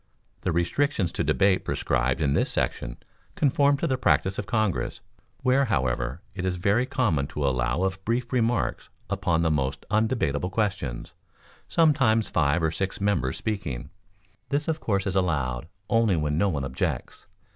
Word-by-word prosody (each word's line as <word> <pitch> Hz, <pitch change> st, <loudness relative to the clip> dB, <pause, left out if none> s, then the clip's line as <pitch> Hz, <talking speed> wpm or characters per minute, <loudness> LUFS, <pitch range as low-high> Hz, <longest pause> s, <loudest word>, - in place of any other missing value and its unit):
The 90 Hz, -, 0 dB
restrictions 90 Hz, -, +1 dB
to -, -, -1 dB
debate 95 Hz, -1 st, +3 dB
prescribed 60 Hz, +5 st, 0 dB
in 70 Hz, -2 st, +2 dB
this -, -, +2 dB
section -, -, -2 dB, 0.4 s
conform 140 Hz, 0 st, +3 dB
to 155 Hz, -, -1 dB
the 130 Hz, -5 st, 0 dB
practice 95 Hz, -5 st, +2 dB
of 105 Hz, -, -4 dB
Congress, 110 Hz, -6 st, 0 dB, 0.4 s
where, 130 Hz, +2 st, +4 dB
however, 65 Hz, -, -1 dB
it 90 Hz, -, -5 dB
is 95 Hz, -1 st, 0 dB
very 100 Hz, +8 st, +1 dB
common 95 Hz, -, +1 dB
to 70 Hz, -1 st, -2 dB
allow 65 Hz, +5 st, 0 dB
of 95 Hz, 0 st, -2 dB
brief 120 Hz, +3 st, -1 dB
remarks 120 Hz, -1 st, 0 dB, 0.2 s
upon 85 Hz, -1 st, +1 dB
the 80 Hz, -, +2 dB
most 70 Hz, -3 st, -1 dB
undebatable 110 Hz, -, +1 dB
questions, 90 Hz, -, -2 dB, 0.6 s
sometimes 135 Hz, -9 st, +3 dB
five 80 Hz, 0 st, +2 dB
or 80 Hz, -, +2 dB
six 95 Hz, +4 st, -3 dB
members 100 Hz, -11 st, 0 dB
speaking; 95 Hz, -, -4 dB, 0.6 s
this 145 Hz, +2 st, 0 dB
of 160 Hz, -1 st, 0 dB
course 100 Hz, -7 st, 0 dB
is 95 Hz, -2 st, -2 dB
allowed 75 Hz, -9 st, 0 dB, 0.2 s
only 115 Hz, -4 st, +3 dB
when 75 Hz, -1 st, 0 dB
no 100 Hz, +6 st, +2 dB
one 75 Hz, -6 st, -2 dB
objects. 65 Hz, 0 st, -3 dB
95 Hz, 155 wpm, -26 LUFS, 75-115 Hz, 0.6 s, where